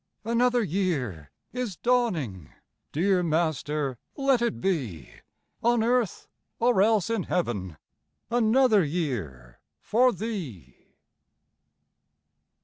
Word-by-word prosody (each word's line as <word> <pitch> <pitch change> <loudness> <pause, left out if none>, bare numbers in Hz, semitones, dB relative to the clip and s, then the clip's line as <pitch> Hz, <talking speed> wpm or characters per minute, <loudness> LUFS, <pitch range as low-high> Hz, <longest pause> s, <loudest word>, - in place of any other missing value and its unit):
Another 240 +2 +2
year 145 - -2 0.2
is 245 -6 -3
dawning! 170 - 0 0.4
Dear 185 +4 +2
Master, 155 -5 -1 0.2
let 270 -3 +2
it 235 -2 -1
be 125 - -2 0.5
On 235 -1 +3
earth, 240 -4 0 0.3
or 235 -4 +3
else 220 0 +3
in 225 -3 0
heaven, 100 - -2 0.5
Another 235 -2 +4
year 110 - -4 0.2
for 250 +4 +3
Thee! 165 - -7
185 Hz, 90 wpm, -27 LUFS, -, 0.5 s, Another